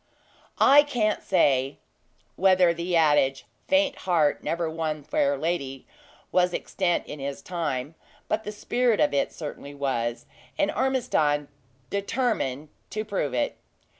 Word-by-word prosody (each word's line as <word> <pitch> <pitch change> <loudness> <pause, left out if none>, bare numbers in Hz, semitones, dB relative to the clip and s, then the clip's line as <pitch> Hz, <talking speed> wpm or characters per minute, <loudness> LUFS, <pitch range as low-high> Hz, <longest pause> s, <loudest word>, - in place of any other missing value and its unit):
I 285 +2 +7
can't 240 -8 0
say 135 -7 +2 0.6
whether 185 -2 +4
the 170 +1 -2
adage! 145 -4 +3 0.2
"Faint 285 0 +2
heart 155 -5 +2
never 170 0 -1
won 160 -2 -3
fair 285 - +1
lady!" 140 -6 -3 0.5
was 180 -1 +2
extant 180 -3 -1
in 150 - -8
his 140 0 -5
time; 150 -5 -3 0.3
but 220 +1 -1
the 210 - -5
spirit 235 +2 0
of - - +3
it 140 - +1
certainly 145 -2 -8
was, 120 -4 -2 0.3
and 200 - +2
Ormiston 150 - +1 0.4
determined 200 - -1 0.2
to 215 0 -4
prove 170 - -2
it. 120 - -1
170 Hz, 130 wpm, -26 LUFS, 140-210 Hz, 0.6 s, I